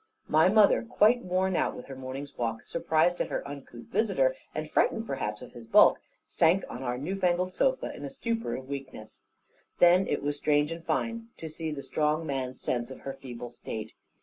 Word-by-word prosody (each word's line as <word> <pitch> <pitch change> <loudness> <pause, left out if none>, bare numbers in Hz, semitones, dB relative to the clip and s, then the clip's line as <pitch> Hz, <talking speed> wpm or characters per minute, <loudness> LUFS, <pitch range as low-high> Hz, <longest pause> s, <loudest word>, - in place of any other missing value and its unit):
My 155 +3 +5
mother, 210 0 +5
quite 235 +1 +3
worn 185 0 0
out - - +1
with - - -9
her 135 - -8
morning's 130 +2 -7
walk, 115 -2 -3
surprised 170 +1 +1
at - - -1
her - - -3
uncouth 140 -4 -9
visitor, 365 - +2 0.2
and - - -3
frightened 225 -1 +1
perhaps 105 - -3
at 125 - -11
his 115 -1 -11
bulk, - - +6 0.3
sank 170 +4 +3
on 125 - -7
our 125 -1 -2
new 155 +9 -3
fangled 180 -1 +1
sofa, - - +1
in - - -9
a - - -4
stupor 230 -4 -2
of 130 - -7
weakness. 135 -6 -8 0.6
Then 180 +2 +6
it 145 - -1
was 145 0 -1
strange 145 +1 +2
and 165 0 -6
fine 230 +5 -2
to 160 - -6
see 160 +1 -4
the 145 -2 -5
strong 155 +1 0
man's 130 -3 -3
sense 120 -1 -2
of 130 - -9
her 135 - -5
feeble 125 -3 -8
state. 110 -2 -7
150 Hz, 200 wpm, -29 LUFS, 130-185 Hz, 0.6 s, bulk